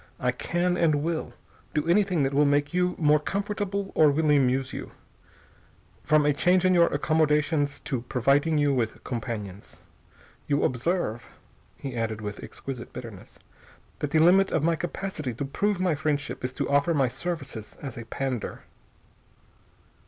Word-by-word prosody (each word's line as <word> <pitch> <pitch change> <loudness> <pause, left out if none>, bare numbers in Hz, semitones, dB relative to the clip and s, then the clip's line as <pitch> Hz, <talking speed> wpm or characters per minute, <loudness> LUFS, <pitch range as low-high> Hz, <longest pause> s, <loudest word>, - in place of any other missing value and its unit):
I 125 -1 +1
can, 175 +7 -1
and 155 -4 +2
will, 165 -1 -3 0.4
do 150 +1 0
anything 180 -3 +3
that 135 +1 0
will 145 +2 +4
make 145 +2 +2
you 180 0 +1
more 150 -1 +4
comfortable 200 +2 -3
or 155 -1 +5
will 150 +1 +2
amuse 135 -2 +2
you, - - -7 1.1
from 155 -1 +3
a 150 - +4
change 180 +5 +3
in 185 - +5
your 170 -1 +5
accommodations 150 -1 +1
to 130 -4 -3
providing 140 +6 +2
you 145 -1 +3
with 115 -4 -2
companions. 105 -5 -6 0.7
You 145 0 +1
observe," 125 -3 -1 0.5
he 135 -3 -6
added 110 -2 -2
with 105 -1 -6
exquisite 130 -3 -7
bitterness, 115 -7 -10 0.6
"that 150 - -2
the 160 - +1
limit 185 +4 +5
of 160 - +1
my 165 +1 +3
capacity 160 -6 -4
to 140 - -3
prove 200 +8 -1
my 185 -2 +2
friendship 145 -2 -2
is 125 - -2
to - - -2
offer 145 +4 +2
my 135 -3 +3
services 135 -5 -5
as 135 -4 -7
a 115 - -7
pander." 130 0 -4
145 Hz, 155 wpm, -26 LUFS, 130-170 Hz, 1.1 s, or